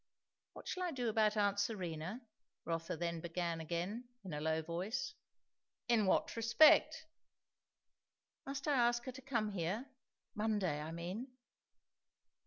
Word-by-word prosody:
"What -, -, -11 dB
shall 370 Hz, -, -3 dB
I 360 Hz, -, 0 dB
do 250 Hz, -7 st, -1 dB
about 215 Hz, -1 st, +3 dB
aunt 205 Hz, -1 st, +2 dB
Serena?" 185 Hz, 0 st, -2 dB, 0.4 s
Rotha 165 Hz, -1 st, -2 dB
then 170 Hz, 0 st, -2 dB
began 170 Hz, -1 st, -2 dB
again, 175 Hz, +9 st, -3 dB, 0.2 s
in 185 Hz, -5 st, -6 dB
a 150 Hz, -, -3 dB
low 160 Hz, +1 st, 0 dB
voice. 195 Hz, -, -3 dB, 0.7 s
"In 225 Hz, -4 st, +3 dB
what -, -, +2 dB
respect?" 305 Hz, +7 st, +6 dB, 1.4 s
"Must 275 Hz, +1 st, -4 dB
I 295 Hz, -, +3 dB
ask 240 Hz, -2 st, +3 dB
her 255 Hz, -, -5 dB
to 260 Hz, +1 st, -10 dB
come 230 Hz, -6 st, -1 dB
here? 200 Hz, +8 st, -2 dB, 0.4 s
Monday, 205 Hz, -8 st, 0 dB
I 155 Hz, -, -5 dB
mean?" 175 Hz, +9 st, -4 dB
210 Hz, 135 wpm, -37 LUFS, 170-240 Hz, 1.4 s, respect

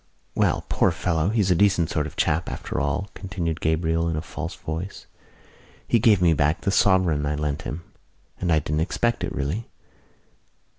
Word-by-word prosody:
"Well, -, -, +1 dB
poor -, -, +3 dB
fellow, 85 Hz, -1 st, 0 dB
he's 105 Hz, -4 st, +2 dB
a -, -, +5 dB
decent 95 Hz, -3 st, +3 dB
sort 75 Hz, -3 st, 0 dB
of -, -, -11 dB
chap 80 Hz, +3 st, +1 dB
after -, -, -4 dB
all," 75 Hz, +8 st, -1 dB
continued 90 Hz, -5 st, -4 dB
Gabriel 80 Hz, +1 st, +1 dB
in 80 Hz, -, -1 dB
a 75 Hz, -, -2 dB
false -, -, -6 dB
voice. 80 Hz, +5 st, -6 dB, 0.8 s
"He 115 Hz, -, +3 dB
gave 105 Hz, -5 st, +4 dB
me 85 Hz, -2 st, +5 dB
back 75 Hz, +1 st, +1 dB
that 100 Hz, -, 0 dB
sovereign 95 Hz, -7 st, +3 dB
I 75 Hz, -, 0 dB
lent 75 Hz, -1 st, -2 dB
him, 85 Hz, +4 st, -5 dB, 0.6 s
and 90 Hz, -2 st, 0 dB
I 80 Hz, -, +5 dB
didn't 75 Hz, +1 st, -1 dB
expect 120 Hz, +7 st, 0 dB
it, -, -, -2 dB
really. 75 Hz, +11 st, -3 dB
85 Hz, 180 wpm, -24 LUFS, 75-95 Hz, 0.8 s, a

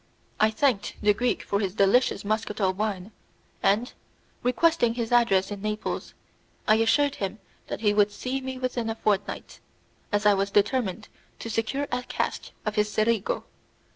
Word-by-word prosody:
I 215 Hz, -, +5 dB
thanked 220 Hz, -2 st, 0 dB
the 210 Hz, 0 st, +5 dB
Greek 245 Hz, +4 st, 0 dB
for 200 Hz, -, -1 dB
his 195 Hz, -2 st, -2 dB
delicious 200 Hz, +1 st, +3 dB
muscatel 210 Hz, -2 st, 0 dB
wine, 200 Hz, 0 st, -3 dB, 0.5 s
and, 210 Hz, +5 st, +2 dB, 0.5 s
requesting 250 Hz, -1 st, +2 dB
his 235 Hz, -1 st, -3 dB
address 220 Hz, -6 st, +3 dB
in 200 Hz, -1 st, -5 dB
Naples, 215 Hz, 0 st, -3 dB, 0.5 s
I 215 Hz, -, +6 dB
assured 280 Hz, +6 st, +2 dB
him 195 Hz, +1 st, -3 dB, 0.3 s
that -, -, -5 dB
he 210 Hz, -2 st, +3 dB
would 205 Hz, 0 st, +3 dB
see 255 Hz, +6 st, -3 dB
me 260 Hz, 0 st, -5 dB
within 250 Hz, -3 st, -2 dB
a 225 Hz, -, -2 dB
fortnight, 205 Hz, -3 st, -2 dB, 0.5 s
as 205 Hz, 0 st, 0 dB
I 210 Hz, -, +7 dB
was 195 Hz, 0 st, 0 dB
determined 210 Hz, -1 st, +1 dB, 0.3 s
to 230 Hz, -, -6 dB
secure 225 Hz, +6 st, -1 dB
a 245 Hz, -, 0 dB
cask 250 Hz, -, -3 dB, 0.2 s
of 215 Hz, -, -1 dB
his 210 Hz, 0 st, +2 dB
Cerigo. 215 Hz, 0 st, +1 dB
215 Hz, 160 wpm, -26 LUFS, 205-245 Hz, 0.5 s, I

